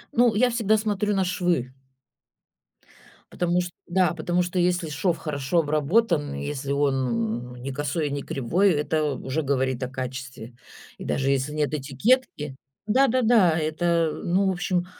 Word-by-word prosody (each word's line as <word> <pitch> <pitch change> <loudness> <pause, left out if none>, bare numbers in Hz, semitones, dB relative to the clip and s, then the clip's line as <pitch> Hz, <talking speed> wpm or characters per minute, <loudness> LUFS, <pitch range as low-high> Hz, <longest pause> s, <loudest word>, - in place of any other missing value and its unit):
Ну, 235 -2 +4
я 245 +3 +4
всегда 220 -2 +2
смотрю 210 -1 0
на 190 - +1
швы. 175 -9 -1 1.6
Потому 175 0 +1
что, 175 0 -5 0.2
да, 180 0 +2
потому 175 +2 0
что, 180 +1 -2
если 175 -2 +1
шов 165 +3 0
хорошо 150 +2 -1
обработан 155 +1 +1
и - - -5
если 140 -1 -4
он, 140 -1 +2 0.5
ну, 125 0 -10
не 130 +3 -6
косой 145 +3 -2
и - - -4
не 140 0 -2
кривой, 175 +10 +1
это 155 0 0
уже 135 +6 -3
говорит 130 -2 0
о 125 - -3
качестве. 130 -2 -6 0.4
И - - -8
даже 135 0 0
если 140 +2 0
нет 150 0 -1
этикетки, 150 - 0 0.3
да-да-да, 225 -7 +4
это, 165 +1 +1
ну, 190 +3 +2
в 190 - +2
общем. 180 0 -1
160 Hz, 155 wpm, -25 LUFS, 140-185 Hz, 1.6 s, Ну